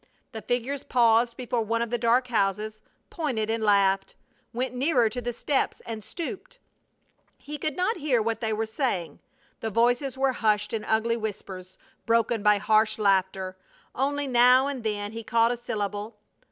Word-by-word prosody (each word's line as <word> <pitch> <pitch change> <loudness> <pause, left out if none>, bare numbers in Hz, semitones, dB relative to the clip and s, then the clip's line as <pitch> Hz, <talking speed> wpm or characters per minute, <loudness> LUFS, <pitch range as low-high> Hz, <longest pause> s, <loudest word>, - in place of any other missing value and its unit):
The 220 - -7
figures 250 +4 -2
paused 235 -1 +3
before 245 -2 -1
one 230 +1 0
of 235 - -6
the 240 - +1
dark 245 +2 +2
houses, 215 0 -1 0.3
pointed 235 -10 -2
and 225 -1 -1
laughed; 195 -2 +2 0.4
went 250 +1 -3
nearer 250 -3 +2
to 245 +3 -5
the 240 0 -2
steps 265 +4 -1
and 220 -2 -6
stooped. 375 - -7 0.8
He 295 0 -8
could 310 +1 -2
not 370 +6 0
hear 280 -5 +1
what 225 +1 -2
they 220 -1 -1
were 220 +1 -1
saying; 220 - -2 0.4
the 225 - -3
voices 245 +4 +1
were 265 0 +2
hushed 210 -2 0
in 220 -2 -2
ugly 225 +1 +1
whispers, 190 -4 -7 0.3
broken 230 -1 +2
by 210 0 +4
harsh 215 +2 +2
laughter. 190 -2 +1 0.4
Only 285 +2 -1
now 250 0 +5
and 275 -4 -4
then 205 -1 -2
he 225 +1 -6
caught 230 +1 +2
a - - 0
syllable. 210 -2 -4
230 Hz, 165 wpm, -26 LUFS, 215-250 Hz, 0.8 s, now